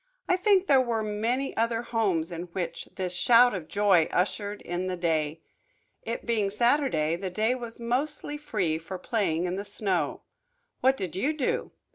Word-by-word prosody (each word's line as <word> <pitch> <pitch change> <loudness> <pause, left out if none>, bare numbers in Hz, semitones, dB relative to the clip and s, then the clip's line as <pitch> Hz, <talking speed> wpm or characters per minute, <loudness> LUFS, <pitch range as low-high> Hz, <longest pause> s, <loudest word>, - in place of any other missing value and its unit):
I 370 - +4
think 385 0 +3
there 275 -7 +5
were 230 -3 -1
many 230 +6 -1
other 230 +1 0
homes 195 -9 0
in 170 +1 -5
which 170 -3 -4
this 185 -2 -3
shout 240 +5 +5
of 175 -5 -5
joy 200 -5 +3
ushered 205 +3 -1
in 175 +2 -3
the 185 -1 -2
day. 160 -2 -1 0.6
It 230 - -5
being 220 -4 +1
Saturday 225 - +2
the 185 +2 -4
day 220 +6 +1
was 240 -2 -7
mostly 280 +5 -2
free 190 - -1
for 175 +3 -7
playing 185 -6 0
in 180 +1 -2
the 200 - -3
snow. 200 -3 -1 0.6
What 265 +1 +3
did 185 -3 -4
you 270 +11 +1
do? 295 -5 -1
210 Hz, 170 wpm, -27 LUFS, 180-245 Hz, 0.6 s, there